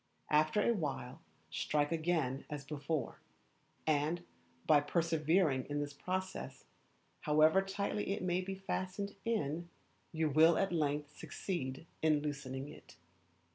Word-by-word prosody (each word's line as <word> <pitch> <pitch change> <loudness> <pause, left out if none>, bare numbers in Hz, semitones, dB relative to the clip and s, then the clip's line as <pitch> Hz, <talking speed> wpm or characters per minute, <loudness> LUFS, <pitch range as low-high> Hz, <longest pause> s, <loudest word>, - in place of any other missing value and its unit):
After 155 +7 +4
a 235 - +5
while 140 - -3 0.3
strike 145 0 0
again 160 -5 0
as 145 -2 -5
before; 145 -1 -3 0.7
and, 155 +2 +1 0.4
by 150 -2 +6
persevering 160 -2 +2
in 145 0 -1
this 145 0 -3
process, 185 +5 -4 0.5
however 155 +5 +5
tightly 200 +1 -2
it 200 0 -2
may 180 0 +1
be 190 +1 -4
fastened 195 +1 -3
in, 170 -7 -1 0.4
you 160 -1 +1
will 160 +3 +6
at 195 -2 +1
length 150 -2 -1
succeed 140 -6 -4 0.2
in 155 -2 +3
loosening 135 -2 -4
it. 150 - -13
155 Hz, 125 wpm, -35 LUFS, 145-185 Hz, 0.7 s, by